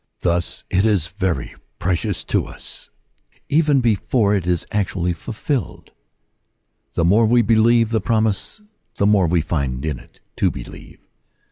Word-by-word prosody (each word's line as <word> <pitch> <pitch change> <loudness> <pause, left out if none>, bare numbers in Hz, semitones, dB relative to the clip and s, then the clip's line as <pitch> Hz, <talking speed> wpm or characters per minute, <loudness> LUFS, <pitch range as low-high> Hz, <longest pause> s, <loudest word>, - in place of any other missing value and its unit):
Thus 85 0 0
it 95 - +3
is 105 -7 +2
very 90 -7 -3 0.2
precious 90 -2 -1
to - - -1
us - - -7 0.6
even 150 -2 +3
before 110 -1 +2
it 95 -4 -1
is 90 -2 0
actually 95 -4 -1
fulfilled. 115 - -4 1.0
The 85 - +1
more 110 +6 +4
we 120 +1 +4
believe 115 +1 +3
the 110 - +1
promise, 110 - 0 0.3
the 100 - +1
more 100 -4 +4
we 85 0 +2
find 70 -4 -2
in 75 -5 -2
it - - -20 0.2
to - - +3
believe. - - -10
100 Hz, 140 wpm, -20 LUFS, 85-115 Hz, 1.0 s, more